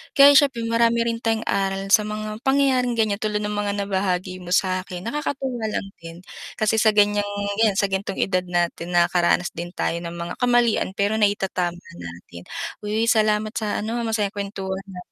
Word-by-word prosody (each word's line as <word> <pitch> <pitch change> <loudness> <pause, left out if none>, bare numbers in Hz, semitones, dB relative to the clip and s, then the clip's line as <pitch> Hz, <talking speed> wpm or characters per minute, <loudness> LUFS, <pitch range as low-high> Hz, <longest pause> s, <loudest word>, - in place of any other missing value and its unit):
kaya 280 -1 +9
siyempre 270 -5 +4
marami 230 0 +2
rin 230 0 -1
tayong 225 0 0
aral 195 0 -1
sa 215 -1 +6
mga 215 0 -5
pangyayaring 265 -3 +2
ganyan 210 -2 +1
tulad 210 -1 0
ng 210 - -2
mga 205 -1 -1 0.2
nabahagi 185 -1 -1
mo 180 - -8
sa'kin, 185 -1 0
nakakatuwa 265 -3 -3
lang 195 - -3 0.2
din, 165 +1 -9 0.4
kasi 215 0 +2
sa 220 0 +5
ganyang 205 0 +3 0.4
yan 210 -3 +3
sa 200 - +2
gantong 195 0 -3
edad 185 -2 +1
natin 175 0 -1
nakakaranas 175 0 +2
din 175 +1 -6
tayo 165 - -1
ng 170 - -5
mga 170 +1 -5
kamalian 240 -4 +2
pero 205 +2 +1
naitatama 190 -4 0 0.2
natin. 85 0 -10 0.4
Uy, 215 +2 0
salamat 215 -1 +2
sa 215 -2 -1
ano 230 +3 -3
masayang 215 -3 0
kwentuhan 195 -1 -4 0.2
ah. 180 - -7
205 Hz, 170 wpm, -23 LUFS, 185-225 Hz, 0.4 s, kaya